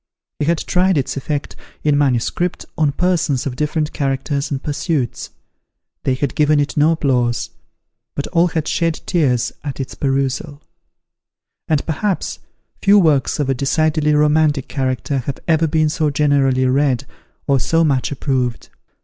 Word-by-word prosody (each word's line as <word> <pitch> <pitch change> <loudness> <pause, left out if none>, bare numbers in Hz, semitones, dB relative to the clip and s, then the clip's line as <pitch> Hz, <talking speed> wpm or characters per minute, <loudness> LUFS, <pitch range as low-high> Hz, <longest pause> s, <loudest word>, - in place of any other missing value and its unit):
He 145 - 0
had 170 +2 +2
tried 180 +2 +1
its 135 - -1
effect, 145 +1 -3 0.3
in 150 -1 +3
manuscript, 145 +5 0
on 150 -2 +2
persons 165 -5 0
of 135 -3 -3
different 150 +2 -1
characters 140 0 -1
and 140 -2 -3
pursuits. 145 -4 -2 0.8
They 130 - +2
had 140 +1 -2
given 150 0 +3
it 145 0 -1
no 155 +2 +4
applause; 125 -6 0 0.6
but - - -2
all 170 +1 +3
had 160 -2 -2
shed 165 -1 0
tears 125 -9 +1
at 140 -2 -5
its 135 - -4
perusal: 140 +2 -2 1.0
and 155 -3 +1
perhaps, 180 +5 -2 0.4
few 205 0 +5
works 155 -8 +3
of 145 - 0
a 135 - +2
decidedly 150 +3 +1
romantic 150 -2 +2
character 130 0 -1
have 135 +2 -4
ever 165 -1 +3
been 155 0 +2
so 155 0 0
generally 140 -3 +2
read, 130 -1 +1 0.4
or 140 -1 +2
so 165 +6 +2
much 140 -4 +1
approved. 130 -4 -2
145 Hz, 150 wpm, -19 LUFS, 135-155 Hz, 1.0 s, few